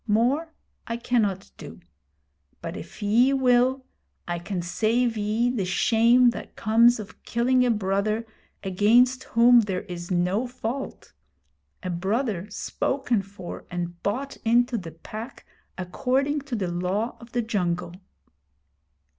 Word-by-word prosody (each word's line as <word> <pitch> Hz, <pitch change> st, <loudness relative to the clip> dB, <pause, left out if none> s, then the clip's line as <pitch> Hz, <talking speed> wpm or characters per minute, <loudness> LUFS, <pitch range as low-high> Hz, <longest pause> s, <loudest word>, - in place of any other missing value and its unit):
More 255 Hz, +10 st, +1 dB, 0.4 s
I 230 Hz, -, -2 dB
cannot 215 Hz, -6 st, 0 dB
do; -, -, -10 dB, 0.8 s
but -, -, -6 dB
if -, -, -9 dB
ye 240 Hz, +6 st, +4 dB
will, 260 Hz, 0 st, +3 dB, 0.4 s
I 175 Hz, 0 st, -2 dB
can 180 Hz, 0 st, -4 dB
save 225 Hz, +6 st, +1 dB
ye 220 Hz, +3 st, +1 dB
the 230 Hz, -6 st, -1 dB
shame 235 Hz, +6 st, +4 dB
that -, -, -9 dB
comes 230 Hz, +2 st, +4 dB
of 215 Hz, +1 st, -10 dB
killing 250 Hz, +2 st, +2 dB
a 250 Hz, -, +2 dB
brother 210 Hz, +1 st, 0 dB, 0.4 s
against 235 Hz, +7 st, +3 dB
whom 240 Hz, +1 st, +6 dB
there 195 Hz, -5 st, -1 dB
is 175 Hz, -1 st, -7 dB
no 185 Hz, +6 st, +1 dB
fault, 245 Hz, +2 st, -6 dB, 0.7 s
a 185 Hz, -, -2 dB
brother 200 Hz, +2 st, -1 dB
spoken 240 Hz, +2 st, -1 dB
for 195 Hz, -2 st, -9 dB
and 175 Hz, -1 st, -5 dB
bought 265 Hz, +8 st, -3 dB
into 240 Hz, +2 st, +2 dB
the 175 Hz, -7 st, -5 dB
Pack 215 Hz, +9 st, -9 dB, 0.3 s
according 260 Hz, +10 st, 0 dB
to 245 Hz, -, -1 dB
the 185 Hz, -5 st, -2 dB
Law 185 Hz, +6 st, -1 dB
of 235 Hz, 0 st, -14 dB
the 240 Hz, -1 st, 0 dB
Jungle.' 180 Hz, -6 st, -1 dB
225 Hz, 130 wpm, -25 LUFS, 190-245 Hz, 0.8 s, whom